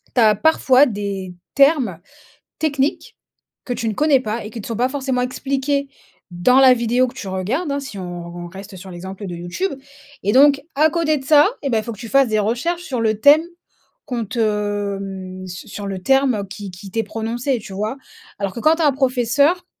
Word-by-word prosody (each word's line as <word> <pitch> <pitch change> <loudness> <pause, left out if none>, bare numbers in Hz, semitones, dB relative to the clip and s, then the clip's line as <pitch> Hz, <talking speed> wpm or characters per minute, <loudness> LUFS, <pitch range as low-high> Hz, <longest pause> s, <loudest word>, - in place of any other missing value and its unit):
tu - - +3
as 215 -2 +5
parfois 275 0 +4
des 200 -4 -4 0.2
termes 275 - +3 0.6
techniques 285 -2 -1 0.5
que 250 - -2
tu 230 - -3
ne - - -2
connais 295 0 +4
pas 225 -2 -4
et 210 - -8
qui 225 - -7
te - - -8
sont 230 - -3
pas 245 +2 +2
forcément 265 -2 -1
expliqués 275 +2 -1 0.4
dans 175 +10 +3
la 260 -1 +8
vidéo 240 +2 +1
que 250 - -10
tu 230 - -7
regardes, 215 - -2
hein, 280 - -1
si 270 -7 -8
on 175 -1 -6
on 175 0 -6
reste 195 +2 -10
sur 190 +1 -10
l'exemple 190 +3 -8
de 175 - -6
YouTube 175 - -3 0.5
et 200 - +2
donc, 280 +1 +6
à 305 +3 +4
côté 320 -2 +1
de 265 - -9
ça 295 +2 +6 0.2
et 280 - -1
beh, 225 - +2
il - - -4
faut 235 - -5
que 205 - -14
tu 230 - -7
fasses 275 -1 +4
des 215 - +1
recherches 245 +12 -1
sur 255 -8 -3
le 220 -2 +1
thème 290 +4 +7 0.6
qu'on 240 -4 -3
te 235 +4 -5 0.6
hem 185 -1 -7
su 180 0 -9
sur 205 -1 -6
le 195 -1 -4
terme, 270 0 +3
heu, 205 - -3
qui 200 +1 -8
qui 185 +2 -11
t'est 225 - 0
prononcé, 235 +5 -2
tu 205 -2 -10
vois? 215 +6 -3 0.4
Alors 200 -2 -2
que - - -6
quand 310 +4 +5
tu 335 - 0
as - - +5
un 285 - +3
professeur, 270 +6 +2
240 Hz, 220 wpm, -20 LUFS, 200-275 Hz, 0.6 s, la